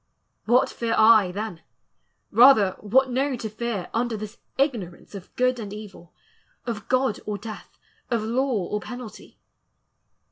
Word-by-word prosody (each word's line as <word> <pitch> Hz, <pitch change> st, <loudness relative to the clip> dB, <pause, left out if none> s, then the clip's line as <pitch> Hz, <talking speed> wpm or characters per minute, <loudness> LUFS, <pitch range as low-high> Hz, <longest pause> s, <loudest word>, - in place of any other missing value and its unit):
What 240 Hz, +3 st, +4 dB
fear 230 Hz, -1 st, -2 dB
I 220 Hz, -4 st, +6 dB
then? 200 Hz, -3 st, -5 dB, 0.7 s
rather 220 Hz, -4 st, +6 dB
what 255 Hz, +5 st, +2 dB
know 270 Hz, +2 st, 0 dB
to 230 Hz, -2 st, -5 dB
fear 215 Hz, -5 st, -3 dB
Under 230 Hz, -1 st, -1 dB
this 215 Hz, +2 st, -8 dB, 0.2 s
ignorance 230 Hz, -, -2 dB
of 195 Hz, -3 st, -9 dB
good 255 Hz, 0 st, +1 dB
and 210 Hz, -3 st, -6 dB
evil, 205 Hz, -5 st, -10 dB, 0.5 s
Of 225 Hz, -3 st, -5 dB
God 255 Hz, -3 st, +1 dB
or 210 Hz, -1 st, -2 dB
death, 215 Hz, +1 st, -10 dB, 0.3 s
of 235 Hz, -3 st, 0 dB
law 235 Hz, -3 st, 0 dB
or 210 Hz, -, -2 dB
penalty? 240 Hz, +3 st, -10 dB
225 Hz, 140 wpm, -24 LUFS, 205-245 Hz, 0.7 s, I